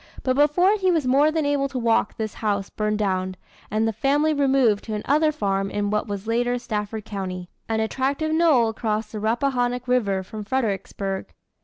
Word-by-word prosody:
But 255 -1 +1
before 355 +8 +4
he 380 -2 +1
was 325 -6 +2
more 275 +4 +4
than 310 -1 0
able 285 -1 +1
to 270 - -5
walk 230 -2 +1
this 220 -1 -3
house 200 -3 -2
burned 210 0 -1
down, 185 -2 -1 0.3
and 220 +1 +1
the 225 - -1
family 290 +7 +2
removed 270 -7 +2
to 220 - -3
another 300 +8 +2
farm 195 -8 -1
in 205 0 -2
what 210 +2 0
was 200 -1 -5
later 245 +2 +1
Stafford 215 -2 -4
County 185 -4 -5 0.2
an 220 0 +1
attractive 275 +7 -1
knoll 315 -8 +4
across 220 -1 -2
the 215 - -5
Rappahannock 245 +2 0
River 205 -7 +1
from 210 +3 -7
Fredericksburg. 200 -4 -2
225 Hz, 180 wpm, -23 LUFS, 210-275 Hz, 0.3 s, before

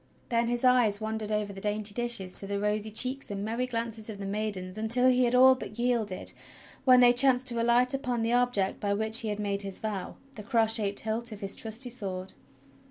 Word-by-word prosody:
Then 235 -1 0
his 240 +1 -2
eyes 245 -5 +3
wandered 220 -1 -4
over 210 -1 -2
the 195 - -10
dainty 210 0 -2
dishes 235 -6 +3
to 195 - -1
the 200 0 -3
rosy 210 +1 -1
cheeks 255 +5 0
and 200 0 -5
merry 235 +3 -2
glances 230 -2 -4
of 215 - -7
the 200 - -7
maid 210 0 -3
ens 185 0 -8
until 230 +4 +4
he 255 0 +3
had 240 +1 0
all 260 +1 +7
but 250 -4 -8
yielded, 235 -6 -2 0.5
when 255 -1 +6
they 245 0 +6
chanced 255 0 +3
to 235 -1 -2
alight 240 +2 +2
upon 250 -4 -2
the 230 +1 0
object 245 -6 0
by 200 -1 -1
which 220 +2 +2
he 225 - -1
had 210 0 -3
made 200 -1 -2
his 195 -1 -6
vow 205 -4 -5
— 275 - -27
the - - -6
cross 225 0 +1
shaped 205 -3 -1
hilt 225 +2 -3
of 210 - -9
his 195 0 -1
trusty 230 +3 -3
sword. 190 -5 -5
220 Hz, 230 wpm, -28 LUFS, 205-245 Hz, 0.5 s, all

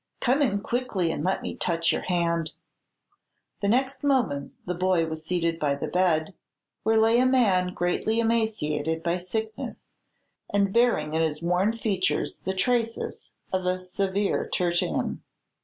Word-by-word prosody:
Come 265 +4 +2
in 200 -7 +1
quickly, 215 -8 -1
and 150 - -3
let 190 +2 0
me - - -4
touch 165 -1 +1
your - - -1
hand." 170 -3 0 1.1
The 200 - +1
next 260 +6 +1
moment 240 - +1
the 180 - -2
boy 180 -1 +2
was 160 -1 -5
seated 170 -1 -1
by 145 -3 +1
the 140 - -4
bed, 180 -1 +1 0.5
where 220 +1 +2
lay 225 +2 +4
a 255 - +4
man 190 -8 +3
greatly 180 +6 0
emaciated 165 -9 0
by 175 +1 0
sickness, 220 +5 -4 0.7
and 200 -1 +1
bearing 230 -11 +2
in 160 - +2
his 160 0 -1
worn 185 +6 +1
features 195 -5 -1
the 190 - -3
traces 230 +3 -1 0.2
of 185 -1 0
a 185 0 +1
severe 195 +2 -1
tertian. 175 -1 0
185 Hz, 150 wpm, -26 LUFS, 170-220 Hz, 1.1 s, lay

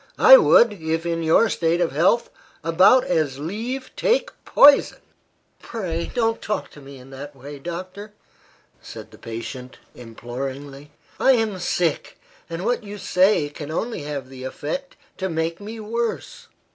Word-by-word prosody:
I - - +9
would, 240 - +5
if 165 -2 -3
in 165 -1 -1
your 165 +8 +4
state 170 -4 0
of 175 - +1
health, 180 - +2 0.3
about 185 +10 +5
as 155 -6 -1
leave 230 - -5
take - - +1
poison." 285 0 +6 0.6
"Pray, 170 -7 -4
don't 225 -2 0
talk 210 - -3
to 150 - -14
me 135 0 -12
in 130 +1 -15
that 140 +2 -9
way, 140 +2 -10
doctor," 185 +6 -7 0.7
said - - -11
the - - -16
patient, 125 +3 -8 0.2
imploringly. 135 +4 -8 0.3
"I 265 - +5
am 220 -5 -1
sick, 175 -2 -1 0.3
and 170 +3 -5
what 245 0 0
you 205 0 -8
say 185 -4 +2
can 145 0 -9
only 225 +7 -3
have 145 -3 -5
the 130 -1 -10
effect 155 - -5 0.2
to 190 0 -3
make 165 +2 -3
me 220 +2 -8
worse. 230 +2 -4
170 Hz, 150 wpm, -22 LUFS, 145-220 Hz, 0.7 s, I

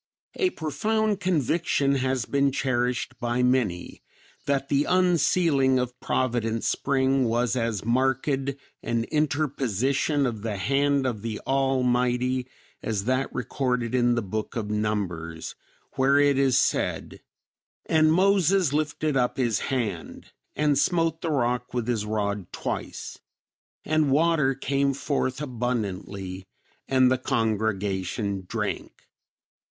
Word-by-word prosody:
A 375 - +1
profound 215 - -1
conviction 165 -5 +1
has 130 -3 0
been 140 0 +1
cherished 125 -1 -1
by 120 +1 0
many 125 -9 0 0.5
that 140 -1 0
the 145 +1 +2
unsealing 170 -6 +3
of 125 0 -3
Providence 115 -3 -1
Spring 135 -1 +1
was 120 +1 +1
as 115 -5 -2
marked 130 +3 +1
an 135 -4 -3
interposition 140 -2 0
of 115 -4 -3
the 110 -2 -3
hand 140 +5 +1
of 115 -5 -2
the 110 -1 -4
Almighty 125 -1 +1 0.3
as 105 -3 -2
that 130 +2 0
recorded 125 -1 -2
in 120 -1 +3
the 120 - -1
Book 105 +2 -4
of 105 -3 -3
Numbers 95 -7 -3 0.4
where 135 +1 +4
it 145 -1 +4
is 135 -2 +3
said, - - -1 0.6
"And 155 -1 +4
Moses 185 -2 +3
lifted 150 0 -1
up 125 -2 +1
his 120 -5 +1
hand, 110 - -4 0.2
and 145 -2 +2
smote 165 0 +1
the 165 - -2
rock 125 -4 -1
with 120 -2 -1
his 110 -4 -1
rod 105 -3 -2
twice; - - -5 0.7
and 155 -2 +2
water 150 -2 +3
came 140 0 0
forth 140 -1 -2
abundantly 100 -7 -4 0.4
and 130 -1 +4
the 130 - +2
congregation 100 -4 -1
drank." - - -4
130 Hz, 120 wpm, -26 LUFS, 115-140 Hz, 0.7 s, where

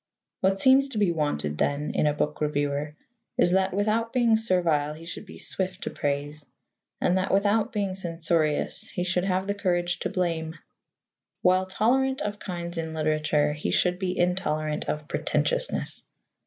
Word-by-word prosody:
What 195 +1 +2
seems 265 +3 +6
to 265 -5 -6
be 205 -4 +3
wanted, 75 - -2
then, 145 +1 0
in 150 - +2
a 150 - +2
book 150 0 -2
reviewer 145 0 -1 0.4
is 175 - +4
that, 190 +1 +2
without 215 +4 0
being 235 -3 +4
servile, 170 -9 +1
he 165 +1 -11
should 190 +4 -7
be - - -11
swift 185 -1 -2
to - - -3
praise, 145 +1 -3 0.6
and 185 +2 +2
that, 185 - -1
without 205 +4 +2
being 200 -5 -1
censorious, 165 -4 0
he 180 - -3
should 180 0 0
have 190 0 0
the 200 - 0
courage 175 -3 0
to - - -2
blame. 165 -3 -2 0.9
While 185 +1 +3
tolerant 265 +7 +1
of 205 0 -4
kinds 175 -2 -5
in 160 -1 -4
literature, 155 -1 +1
he 150 - -3
should 180 0 +2
be 185 -1 -2
intolerant 155 -4 0
of 150 -1 -3
pretentiousness. - - -1
180 Hz, 165 wpm, -26 LUFS, 155-195 Hz, 0.9 s, seems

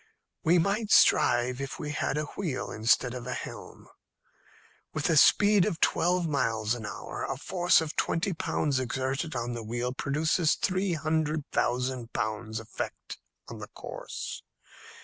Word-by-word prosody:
"We 170 +3 +4
might 200 +5 +1
strive 125 - +4
if 135 - -5
we 150 -1 -4
had 145 -1 -1
a 150 - 0
wheel 165 -10 -3
instead 115 +3 +2
of 125 -1 -6
a 125 - -2
helm. - - -9 1.1
With 155 +2 0
a - - +3
speed 205 +6 +6
of 175 -5 -1
twelve 175 0 +2
miles 115 -7 0
an 115 -4 -5
hour, - - -6
a 135 - -3
force 175 +4 +3
of 160 -1 -4
twenty 190 +3 0
pounds 145 -4 0
exerted 130 +4 -2
on 120 0 -2
the 120 - -5
wheel 120 +3 -3
produces 155 +4 +1
three 185 -1 0
hundred 155 -1 0
thousand 125 -1 -1
pounds' 110 0 -2
effect 110 - -7 0.3
on - - -8
the - - -7
course. - - -6
145 Hz, 150 wpm, -28 LUFS, 120-165 Hz, 1.1 s, speed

